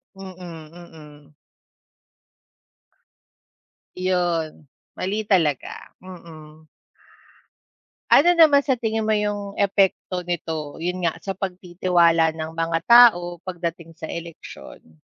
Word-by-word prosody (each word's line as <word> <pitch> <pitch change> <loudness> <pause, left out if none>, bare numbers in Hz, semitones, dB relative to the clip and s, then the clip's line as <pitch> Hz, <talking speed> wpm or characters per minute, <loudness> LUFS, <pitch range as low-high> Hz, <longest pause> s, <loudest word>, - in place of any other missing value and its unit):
Mm, 175 -5 -11
mm. 150 -4 -15 2.6
Iyon 175 -5 -2 0.3
mali 205 +4 -3
talaga, 165 -9 -1
mm. 160 -4 -13 1.4
Ano 345 +4 +5
naman 295 -4 +6
sa 265 -3 -1
tingin 225 -1 -2
mo 215 0 +1
yung 205 -1 -4
epekto 195 -2 0
nito, 160 -4 -5
yun 180 +2 -4
nga 170 -2 -1
sa 195 - -5
pagtitiwala 175 -3 +1
ng 160 0 -6
mga 165 0 -1
tao 175 -8 +5
pagdating 170 -3 -6
sa 160 - -7
eleksyon? 160 - -11
175 Hz, 95 wpm, -22 LUFS, 160-195 Hz, 2.6 s, naman